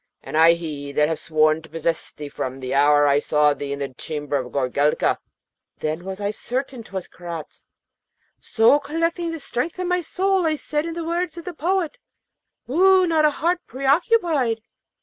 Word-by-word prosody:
and - - -7
I 165 +1 +7
he 150 -4 -5
that 150 +1 +3
have 160 - -2
sworn 155 0 +2
to 160 - -15
possess 165 0 -2
thee 150 - -8
from 130 -2 -5
the 130 0 -4
hour 145 +1 +5
I 140 0 +4
saw 150 0 +3
thee 145 0 -6
in 140 - -2
the 140 -2 -5
chamber 145 +1 -4
of 125 -2 -5
Goorelka,' 140 +2 +1 0.6
then 155 +3 -3
was 190 0 -5
I 205 0 -1
certain 255 +3 -4
'twas 190 -4 -6
Karaz. 170 -3 -9 0.7
So, 230 +5 +4
collecting 330 +3 -1
the 325 -1 -5
strength 275 +5 -3
of 365 - -2
my 360 0 +1
soul, 375 +1 +1
I 310 - +1
said, 300 +1 -2
in 330 - -5
the 335 -1 -4
words 345 0 -2
of 340 - -8
the 360 - -5
poet: 345 0 -1 0.7
'Woo 370 +7 +5
not 320 -3 +3
a - - +6
heart 340 +4 0
preoccupied! 275 - +1
225 Hz, 185 wpm, -23 LUFS, -, 0.7 s, I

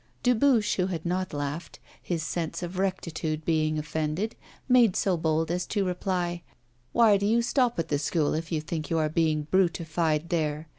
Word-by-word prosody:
Dubuche, 245 -2 +3
who 185 -1 +1
had 170 -3 -4
not 185 +1 -1
laughed, 145 +3 -4 0.2
his 170 -3 -2
sense 165 +2 -3
of 180 +2 -5
rectitude 160 -5 -2
being 155 -1 +1
offended, 155 +6 -2 0.3
made 245 -6 +5
so 190 -2 +2
bold 160 0 0
as 180 +1 -2
to 200 -3 0
reply: 180 -1 -2 0.5
'Why 225 -4 +5
do 200 +1 0
you 230 +2 +3
stop 245 -1 +1
at 165 - -2
the 145 - +1
School 155 0 0
if 165 +2 -3
you 160 -2 0
think 155 -1 -4
you 165 - +1
are 155 -1 +1
being 155 -1 +1
brutified 170 -3 +1
there? 155 -2 -1
170 Hz, 180 wpm, -27 LUFS, 155-190 Hz, 0.5 s, made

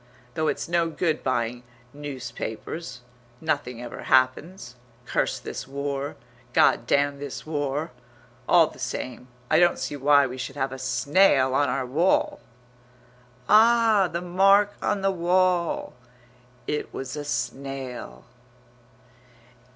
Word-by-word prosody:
"Though 155 +3 -1
it's - - -2
no 170 -1 +1
good 165 0 -1
buying 120 -2 -1 0.3
newspapers.... 130 0 -6 0.4
Nothing 140 -6 -2
ever 120 - -8
happens. 130 +2 +1 0.3
Curse - - -1
this - - -7
war; 140 +1 -4 0.4
God 120 - +3
damn 140 +1 +1
this 145 -2 -7
war!... 150 0 -2 0.6
All - - +7
the - - -11
same, 125 0 -5 0.2
I 155 - +5
don't 175 0 +4
see - - -4
why 140 0 +4
we 130 0 -6
should 135 +2 -5
have 135 -2 -2
a 130 - -7
snail 130 +2 +3
on 145 +2 +2
our 130 0 -1
wall." 160 +9 +1 1.1
Ah, 220 -3 +5
the 170 - -3
mark 195 +3 +4
on 200 - 0
the 195 - +3
wall! 180 -1 +1 0.7
It 150 - -3
was 130 0 -6
a 150 - -4
snail. 130 - -5
145 Hz, 125 wpm, -25 LUFS, 130-170 Hz, 1.1 s, All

